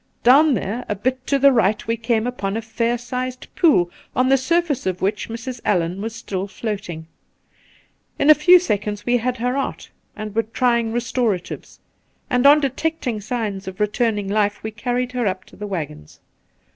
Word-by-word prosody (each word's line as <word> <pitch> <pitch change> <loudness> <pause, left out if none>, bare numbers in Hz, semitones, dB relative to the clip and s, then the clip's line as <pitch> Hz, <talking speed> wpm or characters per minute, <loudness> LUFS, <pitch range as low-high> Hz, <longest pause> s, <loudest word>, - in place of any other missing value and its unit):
Down 280 +4 +6
there, 215 +5 -3
a 210 - 0
bit 255 +5 -2
to 280 - +2
the 275 0 +6
right, 215 -4 +2
we 230 - 0
came 230 -1 0
upon 220 -5 -2
a - - -2
fair 230 +2 -1
si^ed 250 +1 -5
pool, 295 - +4 0.2
on 255 +1 +2
the 270 - +6
surface 295 - 0
of 185 0 -2
which 205 +3 -1
Mrs. 235 +2 -6
AUan 180 -1 0
was 225 +1 -4
stiU 195 0 -3
float 205 -1 -4
ing. 160 -1 -6 1.1
In 280 - +1
a - - +11
few 355 +5 +7
seconds 210 - -2
we 245 0 +3
had 250 +2 -2
her 250 +2 -1
out 275 - -4 0.2
and 215 -1 -6
were 225 - +2
trying 235 0 0
restoratives; 235 -5 -2 0.5
and 250 +2 +4
on 295 +1 +7
detecting 275 -4 -2
signs 210 -3 -3
of 190 +1 -7
re 210 - +4
turning 210 -2 -1
life 205 0 0
we 220 - -4
carried 245 +3 -2
her 245 -3 -1
up 185 -1 -3
to - - -17
the 210 - -6
waggbns. 145 - -6
230 Hz, 185 wpm, -21 LUFS, 205-255 Hz, 1.1 s, a